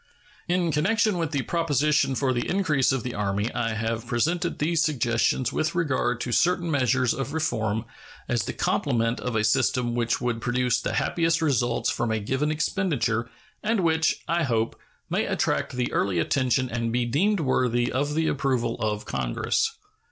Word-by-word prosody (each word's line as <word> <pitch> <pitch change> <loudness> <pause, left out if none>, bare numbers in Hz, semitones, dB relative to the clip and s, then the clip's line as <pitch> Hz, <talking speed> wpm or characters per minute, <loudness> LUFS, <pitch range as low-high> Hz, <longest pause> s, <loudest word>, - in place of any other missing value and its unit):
In 175 -1 +1
connection 200 +6 +1
with 165 -2 -1
the 140 -4 -1
proposition 150 -4 +1
for 130 -1 +1
the 120 - -2
increase 160 -8 +2
of 135 -3 -1
the 125 - -4
Army, 100 +2 -1
I 115 -2 -1
have 115 +1 -2
presented 170 +9 0
these 160 +1 +1
suggestions 125 -5 +1
with 155 +2 -1
regard 140 -7 0
to 125 - -3
certain 175 +4 +2
measures 130 -3 +2
of 135 +1 -4
reform 115 -9 -1 0.4
as 120 -4 0
the - - -3
complement 115 0 0
of 125 -2 -3
a 110 - +2
system 120 +1 +1
which 120 -1 0
would 120 -2 -2
produce 125 -1 +1
the - - -2
happiest 165 -1 +1
results 125 -7 +1
from 120 - -1
a 110 0 0
given 130 +8 -1
expenditure, 150 - 0 0.3
and 220 -1 +1
which, 160 -2 +1
I 170 +1 +1
hope, 115 -6 0 0.3
may - - 0
attract - - 0
the 125 -1 -1
early 95 -3 +1
attention 130 - +1
and 115 -1 -2
be 120 +1 +1
deemed 185 - +1
worthy 125 -3 +1
of 145 +3 -1
the 160 0 +1
approval 130 -4 0
of 105 -1 -2
Congress. 450 - 0
130 Hz, 170 wpm, -25 LUFS, 120-160 Hz, 0.4 s, increase